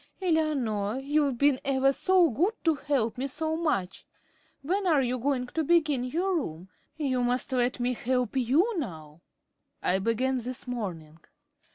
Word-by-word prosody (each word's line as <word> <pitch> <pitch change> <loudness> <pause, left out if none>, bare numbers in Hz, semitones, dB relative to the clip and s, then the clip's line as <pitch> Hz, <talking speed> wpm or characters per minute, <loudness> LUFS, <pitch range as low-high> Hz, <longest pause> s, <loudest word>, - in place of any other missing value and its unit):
Eleanor, 275 - 0
you've 280 -1 0
been 280 0 +3
ever 270 0 +2
so 365 -1 +3
good 360 - +1
to 325 - +4
help 270 -6 -1
me 270 - -1
so 315 +3 -2
much. 195 - -1 0.6
When 380 +6 0
are 300 -6 +4
you 250 0 -1
going 260 0 0
to 320 +6 -2
begin 300 -5 +2
your 360 +9 -1
room? 180 - -5 0.3
You 260 -5 0
must 245 +2 0
let 250 0 +1
me 245 +1 0
help 250 +1 -1
you 310 - +2
now." 160 - -7 0.6
"I 185 +1 +2
began 250 +5 0
this 250 +2 -4
morning." 175 -11 -5
260 Hz, 155 wpm, -28 LUFS, 240-310 Hz, 0.6 s, to